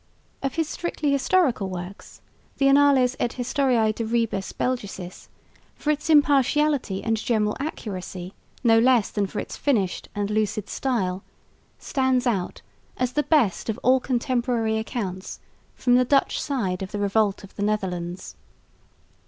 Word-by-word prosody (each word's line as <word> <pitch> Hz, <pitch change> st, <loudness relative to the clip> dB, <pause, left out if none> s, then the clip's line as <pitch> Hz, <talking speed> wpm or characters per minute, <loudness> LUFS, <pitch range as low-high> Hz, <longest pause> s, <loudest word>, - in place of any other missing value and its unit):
Of 275 Hz, -1 st, -2 dB
his 325 Hz, -2 st, 0 dB
strictly 310 Hz, -3 st, -2 dB
historical 275 Hz, -, +2 dB
works 180 Hz, +1 st, -8 dB, 0.4 s
the 275 Hz, -, +2 dB
Annales 275 Hz, -2 st, +4 dB
et 240 Hz, -, 0 dB
Historiae 250 Hz, -3 st, +1 dB
de 230 Hz, -, -4 dB
Rebus 225 Hz, -4 st, -1 dB
Belgicis, 200 Hz, -7 st, -4 dB, 0.5 s
for 300 Hz, -, 0 dB
its 300 Hz, +2 st, -3 dB
impartiality 290 Hz, -6 st, +3 dB
and 225 Hz, -1 st, +1 dB
general 210 Hz, -1 st, 0 dB
accuracy 190 Hz, -, -5 dB, 0.3 s
no 225 Hz, -2 st, +5 dB
less 240 Hz, -3 st, +3 dB
than 205 Hz, -2 st, 0 dB
for -, -, -5 dB
its -, -, -6 dB
finished 210 Hz, -11 st, 0 dB
and 205 Hz, 0 st, -2 dB
lucid 215 Hz, -1 st, -1 dB
style, 195 Hz, -8 st, -1 dB, 0.5 s
stands 260 Hz, -2 st, 0 dB
out 200 Hz, -7 st, -2 dB, 0.3 s
as 250 Hz, 0 st, -1 dB
the 295 Hz, -, +2 dB
best 265 Hz, -, +1 dB
of 220 Hz, -, -2 dB
all 260 Hz, +2 st, +5 dB
contemporary 240 Hz, -3 st, 0 dB
accounts 195 Hz, -5 st, -5 dB, 0.4 s
from 245 Hz, -, +1 dB
the 250 Hz, +1 st, +5 dB
Dutch 275 Hz, +2 st, +2 dB
side 200 Hz, -11 st, -2 dB
of 190 Hz, -, -5 dB
the 210 Hz, -, -3 dB
Revolt 205 Hz, 0 st, +1 dB
of 195 Hz, -, -14 dB
the -, -, -6 dB
Netherlands. 185 Hz, -4 st, -3 dB
230 Hz, 145 wpm, -24 LUFS, 200-265 Hz, 0.5 s, no